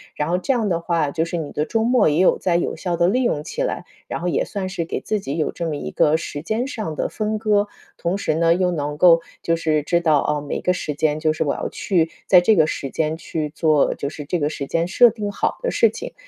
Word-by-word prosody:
然 150 +1 -2
后 175 - +2
这 185 +9 0
样 225 -5 0
的 170 -2 0
话， 170 -3 0
就 160 +3 -1
是 170 +1 -4
你 155 -3 -5
的 150 - -1
周 225 +5 0
末， 245 +1 +3
也 150 0 +2
有 185 - +4
在 180 -2 0
有 175 - -2
效 180 -3 -2
地 170 +1 +2
利 250 +7 +2
用 150 -11 0
起 - - -3
来， - - -3 0.2
然 - - -4
后 175 - -2
也 175 - 0
算 195 -2 -4
是 175 -3 -3
给 - - -4
自 215 - -1
有 155 -4 -2
这 170 - -5
么 155 - -2
一 - - -5
个 150 +1 +3
时 145 -3 -6
间 220 +8 -1
上 215 - -5
的 - - -2
分 215 0 -2
割。 210 -1 +2 0.3
同 170 +2 -1
时 155 -6 -1
呢， 165 +1 +3
又 180 0 +1
能 150 -3 -3
够 165 0 +6 0.2
就 165 - +1
是 155 -2 0
知 170 +3 +1
道， 155 -4 +3
“哦， 150 0 0
每 145 - -4
个 180 - +2
时 155 -4 -3
间 150 +1 0
就 155 0 +1
是 155 - -1
我 145 - 0
要 - - -3
去 175 -6 0 0.2
在 180 - +7
这 215 +5 +4
个 160 -4 +5
时 140 -3 -4
间 155 +3 -1
去 155 -2 -4
做， 155 -1 +2
就 140 - -4
是 150 0 -8
这 175 +4 -1
个 145 -1 0
时 145 -2 -5
间 165 +4 -1
设 240 +6 +6
定 205 -1 -4
好 - - -1
的 - - -1
事 - - +4
情”。 - - -8
170 Hz, 290 characters per minute, -21 LUFS, 155-195 Hz, 0.3 s, 在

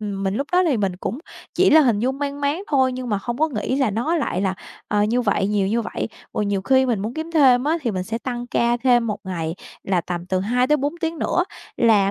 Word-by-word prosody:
ừm, 200 -2 -4
mình 190 - 0
lúc 280 - -2
đó 365 +1 +4
thì 270 - +2
mình 195 -4 -1
cũng 230 +7 -4 0.4
chỉ 375 - +4
là 315 +1 +8
hình 235 -7 +3
dung 265 +4 -1
mang 285 0 -3
máng 285 +6 0
thôi 260 -3 +2
nhưng 255 -1 -5
mà 205 -3 0
hông 240 +4 -4
có 315 - +2
nghĩ 255 0 -2
là 265 -6 +2
nó 245 +12 0
lại 190 - -1
là, 190 -1 0 0.3
ờ, 205 0 +2
như 235 +4 +1
vậy, 200 -3 +1
nhiều 205 -2 +1
như 230 +2 0
vậy, - - -4 0.3
rồi 210 - 0
nhiều 200 -1 -1
khi 260 +5 +3
mình 230 -6 0
muốn 220 +4 -4
kiếm 320 +1 -5
thêm 265 -5 +5
á, 320 +3 +2
thì 235 - 0
mình 185 -2 -2
sẽ 225 +2 -3
tăng 245 -1 -5
ca 235 0 +1
thêm 240 -2 +3
1 210 - -2
ngày 165 -3 -3 0.3
là 185 -3 +1
tầm 175 0 -5
từ 185 0 0
2-4 255 - +1
tiếng 325 -1 -2
nữa 360 - +1 0.3
là 210 -4 +4
240 Hz, 260 wpm, -22 LUFS, 200-275 Hz, 0.4 s, là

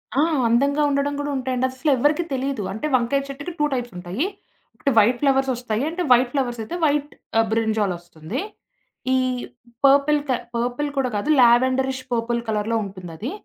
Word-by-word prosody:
ఆ! - - +2 0.3
అందంగా 280 +6 +2
ఉండడం 280 0 0
కూడా 290 0 -2
ఉంటాయండి. 255 0 -1
అస్సలు 260 +4 -1
ఎవ్వరికీ 295 +7 +2
తెలీదు. 265 -4 -2
అంటే, 220 +8 -4
వంకాయ 255 +3 +1
చెట్టుకి 285 +5 -6
2 295 - +3
టైప్స్ 245 -4 -3
ఉంటాయి. 180 - -2 0.5
ఒకటి, 275 - 0
వైట్ 240 +4 +3
ఫ్లవర్స్ 270 -1 +2
ఒస్తాయి. 235 -1 -2
అంటే, 340 +3 -4
వైట్ 245 0 +5
ఫ్లవర్స్ 245 -4 -1
అయితే 330 - -6
వైట్ 295 0 +1 0.3
ఆ! - - +6
బ్రింజాల్ 220 -4 +1
ఒస్తుంది. 175 - -6 0.7
ఈ - - +4 0.7
పర్పుల్‌ 285 +2 +5
క - - +3 0.2
పర్పుల్ 245 +5 -1
కూడా 260 -2 +1
కాదు 205 +8 -2
లావెండరిష్ 260 +2 +3
పర్పుల్ 235 0 0
కలర్‌లో 220 +1 0
ఉంటుందది. 185 - -7
255 Hz, 160 wpm, -22 LUFS, 225-280 Hz, 0.7 s, ఆ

